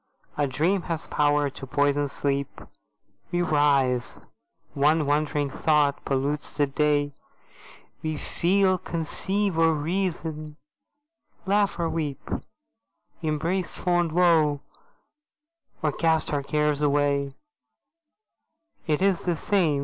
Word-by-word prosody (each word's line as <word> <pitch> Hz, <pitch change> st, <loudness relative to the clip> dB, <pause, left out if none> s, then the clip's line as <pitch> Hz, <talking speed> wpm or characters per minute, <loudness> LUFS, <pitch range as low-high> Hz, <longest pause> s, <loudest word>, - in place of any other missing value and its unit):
A 145 Hz, -1 st, +1 dB
dream 165 Hz, +9 st, +1 dB
has 165 Hz, -1 st, -2 dB
power 145 Hz, -1 st, +1 dB
to 135 Hz, -, -9 dB
poison 145 Hz, +1 st, +1 dB
sleep; 140 Hz, 0 st, -2 dB, 0.7 s
We 175 Hz, 0 st, +1 dB
rise. 140 Hz, -6 st, +1 dB, 0.5 s
One 150 Hz, +2 st, +3 dB
wandering 145 Hz, 0 st, 0 dB
thought 150 Hz, -1 st, +1 dB
pollutes 140 Hz, +2 st, -2 dB
the 145 Hz, -, +3 dB
day; 145 Hz, 0 st, +1 dB, 0.9 s
We 155 Hz, -1 st, -3 dB
feel, 185 Hz, +4 st, +1 dB
conceive 185 Hz, +3 st, -1 dB
or 165 Hz, -1 st, +4 dB
reason, 160 Hz, -2 st, -3 dB, 0.9 s
laugh 200 Hz, +1 st, +2 dB
or 170 Hz, -1 st, 0 dB
weep; 155 Hz, -4 st, -4 dB, 0.9 s
Embrace 165 Hz, +4 st, -1 dB
fond 175 Hz, -2 st, +1 dB
woe, 160 Hz, -4 st, +3 dB, 1.2 s
or 155 Hz, -, +2 dB
cast 160 Hz, +1 st, +1 dB
our 145 Hz, -, +1 dB
cares 150 Hz, +1 st, 0 dB
away: 140 Hz, -1 st, +1 dB, 1.5 s
It 155 Hz, +3 st, +1 dB
is 195 Hz, -3 st, +2 dB
the 175 Hz, -2 st, +1 dB
same! 165 Hz, -5 st, +1 dB
150 Hz, 105 wpm, -25 LUFS, 145-170 Hz, 1.5 s, or